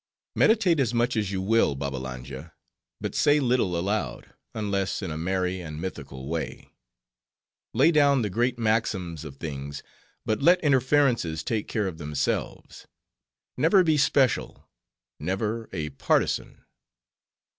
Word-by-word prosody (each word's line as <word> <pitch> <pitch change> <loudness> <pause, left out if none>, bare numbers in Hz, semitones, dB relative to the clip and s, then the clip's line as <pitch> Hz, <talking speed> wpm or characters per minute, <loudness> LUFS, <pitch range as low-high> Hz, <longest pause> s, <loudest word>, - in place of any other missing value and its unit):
"Meditate 205 -8 +4
as 120 -3 +1
much 120 +1 +1
as 105 -3 -1
you 95 -1 -2
will, 110 -8 +3
Babbalanja, 65 +2 -6 0.5
but - - -4
say 150 0 +4
little 120 -9 +1
aloud, 85 - -3 0.2
unless 100 -2 -1
in 90 - -3
a - - -4
merry 90 +2 -1
and 75 -3 -7
mythical 70 -7 -6
way. 80 +1 -5 1.0
Lay 165 - +5
down 140 -5 +4
the 105 - -1
great 120 +4 0
maxims 110 -8 -1
of 75 -4 -9
things, 70 -2 -6 0.4
but 110 +3 -1
let 175 +5 +6
inferences 130 - +2
take 110 -3 -2
care 105 -2 -1
of 85 -3 -6
themselves. 75 -3 -3 0.7
Never 165 +8 +5
be 160 -3 +3
special; 135 -4 +1 0.5
never, 105 +7 -2
a 80 -5 -4
partisan. 70 - -1
100 Hz, 130 wpm, -26 LUFS, 80-125 Hz, 1.0 s, let